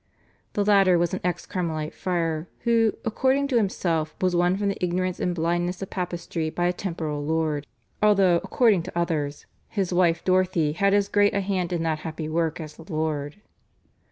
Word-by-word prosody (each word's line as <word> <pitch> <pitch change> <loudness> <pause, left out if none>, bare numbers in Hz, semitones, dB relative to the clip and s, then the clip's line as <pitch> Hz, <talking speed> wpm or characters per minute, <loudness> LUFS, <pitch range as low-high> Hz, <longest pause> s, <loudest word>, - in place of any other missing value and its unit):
The 205 - 0
latter 195 -3 +5
was 170 0 0
an 185 - -1
ex 175 -1 -2
Carmelite 160 -5 -3
friar, 165 -3 -2
who, 230 -2 +3
according 265 +5 +1
to 250 - +2
himself, 165 -7 0
was 185 -1 +1
won 175 +2 +2
from 200 0 0
the 195 - -4
ignorance 180 +1 -1
and 180 -1 -1
blindness 175 +2 -1
of 190 - -8
papistry 175 -3 -3
by 175 +2 -1
a 175 - +2
temporal 160 -6 -4
lord, 155 -1 -1 0.3
although 195 -4 +5
according 195 +2 +2
to 175 +1 -7
others, 150 -4 -1 0.2
"his 190 -4 -2
wife 170 -2 +2
Dorothy 185 -4 +2
had 200 +5 +2
as 200 -1 +2
great 205 -1 +3
a 200 - +2
hand 185 -2 -1
in 170 -2 -1
that 160 -1 0
happy 160 -1 -5
work 160 0 -1
as 155 -2 -8
the 165 +3 -12
Lord." 155 +2 -2
175 Hz, 185 wpm, -25 LUFS, 160-195 Hz, 0.3 s, latter